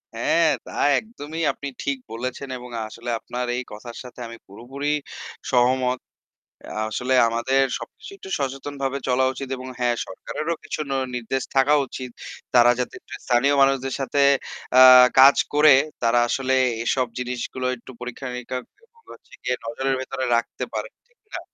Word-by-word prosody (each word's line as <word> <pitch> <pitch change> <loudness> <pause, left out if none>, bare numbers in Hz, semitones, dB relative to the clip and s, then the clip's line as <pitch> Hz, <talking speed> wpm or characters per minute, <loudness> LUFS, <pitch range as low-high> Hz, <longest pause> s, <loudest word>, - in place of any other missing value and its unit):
হ্যাঁ, 160 +7 +3 0.2
তা - - -10 0.3
একদমই 165 -8 -8
আপনি 140 - -7 0.2
ঠিক 140 -1 -1
বলেছেন 130 +4 -5
এবং 125 0 -10 0.2
আসলে 115 +2 -8
আপনার 125 0 -4
এই 125 - -2
কথার 115 +3 -9
সাথে 125 0 -12
আমি 115 0 -10
পুরোপুরি 125 +8 -7 0.6
সহমত। 125 0 +2 0.9
আসলে 125 +4 -1
আমাদের 130 +4 +1 0.2
সবকিছু - - -11
একটু 190 - -11
সচেতনভাবে 135 0 -3
চলা 130 +1 +2
উচিত 135 0 -6
এবং 130 +1 -8
হ্যাঁ, 120 -1 +2
সরকারেরও 155 - -4
কিছু 155 - -5
নি 135 - -1 0.2
নির্দেশ 125 +2 -2
থাকা 135 +2 +4
উচিত। 130 -1 -7 0.4
তারা 120 0 +7
যাতে 125 - -3 0.3
স্থানীয় 130 +3 +3
মানুষদের 135 -1 +2
সাথে 135 +1 -1 0.6
আ - - +9 0.4
কাজ 135 +1 +8 0.2
করে 150 -1 +7 0.3
তারা 120 +1 +3
আসলে 130 +1 0 0.3
এসব 130 +1 +1
জিনিসগুলো 125 +1 -4
একটু 125 +2 -13
পরীক্ষা-নিরীক্ষা 125 0 -5 0.4
করে 460 - -18
হচ্ছে - - -19
গিয়ে 125 0 0
নজরের 135 +3 -1
ভেতরে 130 0 -4
রাখতে 115 - -2
পারে - - -3 0.2
ঠিক 480 - -37
না? - - -3
130 Hz, 150 wpm, -23 LUFS, 125-135 Hz, 0.9 s, আ